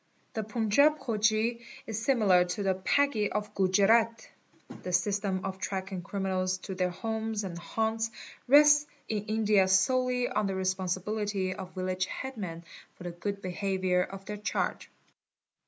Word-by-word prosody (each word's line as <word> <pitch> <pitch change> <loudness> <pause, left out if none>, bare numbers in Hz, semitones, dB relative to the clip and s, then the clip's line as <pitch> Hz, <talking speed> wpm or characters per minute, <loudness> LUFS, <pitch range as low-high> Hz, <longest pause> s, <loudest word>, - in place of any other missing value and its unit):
The 220 - -2
Panjab 225 +8 +3
Khoji 220 0 0 0.2
is 220 -1 -4
similar 210 -9 +4
to 180 +3 -3
the 190 -1 +2
Paggi 215 +3 +1
of 210 0 -3
Gujerat. 215 +4 +3 0.5
The 180 - -5
system 195 +1 0
of 190 0 -4
tracking 190 -1 -4
criminals 185 0 -1
to 190 - -5
their 185 -1 0
homes 220 +3 -3
and 185 -3 -5
haunts. 220 +5 -1 0.4
rests 295 +2 +7 0.2
in 210 -1 -2
India 210 -3 +3
solely 250 +6 +2
on 205 - 0
the 195 - -2
respon 190 0 -1
_ - - -3
sibility 205 -3 -2
of 185 0 -9
village 185 0 -1
headmen 195 -11 -6 0.3
for - - -12
the 175 - -4
good 200 +4 -5
behaviour 185 0 0
of 195 +1 -6
their 210 +1 -5
charge. 210 - -2
200 Hz, 150 wpm, -29 LUFS, 185-220 Hz, 0.5 s, rests